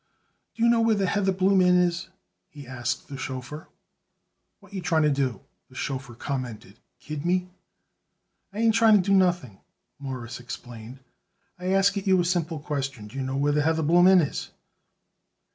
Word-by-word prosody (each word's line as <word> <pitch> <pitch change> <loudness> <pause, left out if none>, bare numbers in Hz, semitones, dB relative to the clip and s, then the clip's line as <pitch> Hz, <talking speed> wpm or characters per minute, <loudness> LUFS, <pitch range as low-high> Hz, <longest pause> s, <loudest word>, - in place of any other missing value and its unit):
"Do 230 - -2
you 235 - +5
know 235 -1 +3
where 225 -1 +3
the 200 -1 0
Heatherbloom 190 0 +2
Inn 180 0 +5
is?" 175 0 0 0.4
he 145 -2 -12
asked 125 0 -4
the 135 -2 -8
chauffeur. 130 +4 -6 0.9
"What - - -19
you 190 - -4
tryin' 165 -2 +1
to 150 - +3
do?" 135 -3 -1 0.3
the 130 - -18
chauffeur 130 -2 -5
commented. 120 -6 -6 0.2
"Kid 145 +3 -6
me?" 180 +1 0 1.0
"I 200 - -11
ain't 225 -1 +4
trying 225 -1 +5
to 195 -2 +2
do 195 - +3
nothing," 175 - +1 0.4
Morris 130 -4 -6
explained. 120 +1 -9 0.6
"I 180 - -5
ask 195 +1 +3
it 200 0 -4
you 190 -1 +4
a 175 - +1
simple 170 -2 -1
question: 135 -7 -4
Do 110 - -14
you 135 - -3
know 130 +1 -3
where 145 +1 +2
the 150 +1 +2
Heatherbloom 160 +3 +4
Inn 190 -2 +6
is?" 145 - -4
155 Hz, 175 wpm, -25 LUFS, 130-185 Hz, 1.0 s, Inn